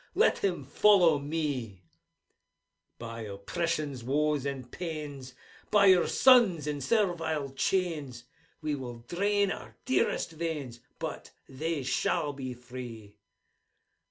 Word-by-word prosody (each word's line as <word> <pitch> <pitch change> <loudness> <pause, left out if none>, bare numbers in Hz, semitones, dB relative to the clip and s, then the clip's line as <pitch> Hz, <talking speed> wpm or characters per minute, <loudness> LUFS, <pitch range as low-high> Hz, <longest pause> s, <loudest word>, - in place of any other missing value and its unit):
Let - - +4
him 180 -7 -1
follow 175 0 +5
me! 140 - -3 1.1
By 115 0 -7
oppression's 135 - -3
woes 145 +2 +1
and 130 -3 -5
pains! 150 -7 -6 0.3
By 210 -1 +5
your 185 -2 +6
sons 225 - +5
in 145 -1 -3
servile 165 - 0
chains! 145 -5 -1 0.4
We 155 -1 0
will 120 -4 -6
drain 200 +2 +1
our - - -7
dearest 260 -8 +1
veins. 155 -7 -4 0.2
But - - -5 0.2
they 155 +2 -3
shall 145 +3 0
be 130 -2 -6
free! 120 -4 -9
145 Hz, 110 wpm, -29 LUFS, 130-170 Hz, 1.1 s, your